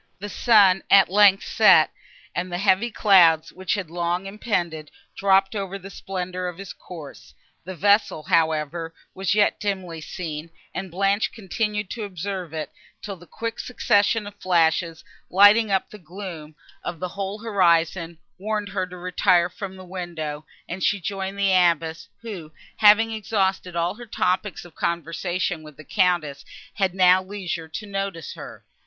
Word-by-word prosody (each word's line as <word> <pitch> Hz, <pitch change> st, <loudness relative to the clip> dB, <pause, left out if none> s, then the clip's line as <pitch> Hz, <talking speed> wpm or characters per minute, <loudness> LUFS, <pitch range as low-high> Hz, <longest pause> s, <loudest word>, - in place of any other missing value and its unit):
The 205 Hz, +2 st, -7 dB
sun, 200 Hz, -5 st, +5 dB
at 195 Hz, -3 st, +6 dB
length, 200 Hz, 0 st, +5 dB
set, -, -, +5 dB, 0.4 s
and 180 Hz, +1 st, -3 dB
the 175 Hz, -, -2 dB
heavy 195 Hz, +4 st, +2 dB
clouds, 175 Hz, -7 st, +4 dB
which 185 Hz, +2 st, -2 dB
had 185 Hz, -6 st, -5 dB
long 175 Hz, +2 st, -2 dB
impended, 175 Hz, -7 st, -3 dB, 0.3 s
dropped 195 Hz, +1 st, +3 dB
over 195 Hz, -1 st, -4 dB
the 195 Hz, 0 st, -11 dB
splendour 185 Hz, -2 st, -5 dB
of 175 Hz, -2 st, -6 dB
his 195 Hz, -1 st, -8 dB
course; 160 Hz, -6 st, -12 dB, 0.3 s
the 185 Hz, +1 st, -6 dB
vessel, 200 Hz, -2 st, +2 dB
however, 160 Hz, +1 st, 0 dB, 0.2 s
was 195 Hz, +1 st, -1 dB
yet 210 Hz, -1 st, +2 dB
dimly 185 Hz, -5 st, -3 dB
seen, 160 Hz, -2 st, -6 dB, 0.2 s
and 190 Hz, 0 st, -5 dB
Blanche 195 Hz, +4 st, +1 dB
continued 210 Hz, 0 st, -3 dB
to 230 Hz, -, -4 dB
observe 190 Hz, -2 st, -5 dB
it, 155 Hz, -1 st, -5 dB, 0.3 s
till 200 Hz, -2 st, -5 dB
the 175 Hz, -1 st, -17 dB
quick 230 Hz, +5 st, -5 dB
succession 210 Hz, -2 st, +1 dB
of 205 Hz, -, -8 dB
flashes, 165 Hz, -2 st, +1 dB, 0.3 s
lighting 205 Hz, +4 st, +6 dB
up 195 Hz, -1 st, 0 dB
the 210 Hz, -, -11 dB
gloom 170 Hz, -3 st, -9 dB, 0.3 s
of 175 Hz, -2 st, -5 dB
the 180 Hz, -, -3 dB
whole 195 Hz, +2 st, -4 dB
horizon, 170 Hz, -5 st, +1 dB, 0.2 s
warned 210 Hz, 0 st, -2 dB
her 190 Hz, -1 st, -2 dB
to 180 Hz, 0 st, -10 dB
retire 180 Hz, 0 st, +2 dB
from 195 Hz, -1 st, -7 dB
the 185 Hz, 0 st, -11 dB
window, 165 Hz, -5 st, -6 dB, 0.2 s
and 185 Hz, +2 st, -6 dB
she 200 Hz, -, +2 dB
joined 195 Hz, +1 st, -4 dB
the 200 Hz, -1 st, +2 dB
Abbess, 165 Hz, -2 st, +2 dB, 0.2 s
who, 185 Hz, -9 st, -7 dB, 0.3 s
having 220 Hz, +2 st, +6 dB
exhausted 195 Hz, -4 st, -1 dB
all 170 Hz, +1 st, 0 dB
her 240 Hz, +2 st, -11 dB
topics 185 Hz, -1 st, -1 dB
of 175 Hz, -, -14 dB
conversation 170 Hz, +1 st, -2 dB
with 150 Hz, -2 st, -13 dB
the 155 Hz, -, -11 dB
Countess, 175 Hz, -8 st, 0 dB, 0.3 s
had 190 Hz, -3 st, -1 dB
now 185 Hz, 0 st, +5 dB
leisure 185 Hz, -4 st, -5 dB
to 160 Hz, +7 st, -7 dB
notice 195 Hz, -5 st, -4 dB
her. -, -, -11 dB
185 Hz, 160 wpm, -23 LUFS, 170-200 Hz, 0.4 s, at